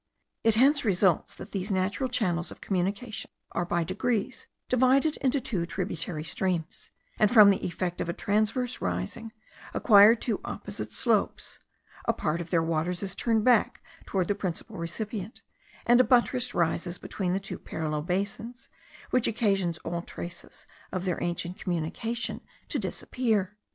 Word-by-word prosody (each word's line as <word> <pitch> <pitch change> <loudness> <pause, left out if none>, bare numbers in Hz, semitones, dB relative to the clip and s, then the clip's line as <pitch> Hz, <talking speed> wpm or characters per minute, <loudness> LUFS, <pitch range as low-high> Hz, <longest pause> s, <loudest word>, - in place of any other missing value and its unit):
It 225 -1 +4
hence 275 +5 +5
results 190 -5 +2
that 205 - -10
these 195 +1 -2
natural 200 +7 0
channels 180 -9 0
of - - -10
communication 200 +4 -2 0.2
are 175 - -1
by 175 0 0
degrees 220 +6 -2 0.2
divided 260 +5 +3
into 275 +1 +1
two 205 -10 -2
tributary 170 -3 -3
streams, 170 0 -2 0.3
and 210 - +5
from 210 -4 +8
the 195 - -1
effect 175 0 -2
of - - -2
a - - +2
transverse 215 +6 0
rising, 90 - -3 0.4
acquire 210 0 +7
two 235 0 -2
opposite - - -5
slopes; - - 0 0.5
a - - +2
part 160 +2 -1
of 170 - -7
their 165 -2 +2
waters 165 +3 -1
is 195 - -3
turned 225 -2 +1
back 245 -4 +3 0.2
towards 185 -3 0
the - - +2
principal 200 +2 -4
recipient, 205 +5 -5 0.4
and 240 +1 +6
a - - +5
buttress 250 -1 +2
rises 170 +1 0
between 180 -1 -3
the 190 - +1
two 195 - -6
parallel 155 -1 -3
basins, 200 +8 -3 0.4
which 250 -2 +3
occasions 195 -7 +1
all 170 +1 -3
traces 175 0 -9 0.3
of 185 0 -3
their 180 -2 -1
ancient 175 +3 -2
communication 185 +7 -2 0.3
to - - -1
disappear. 215 -6 -1
195 Hz, 150 wpm, -28 LUFS, 175-230 Hz, 0.5 s, from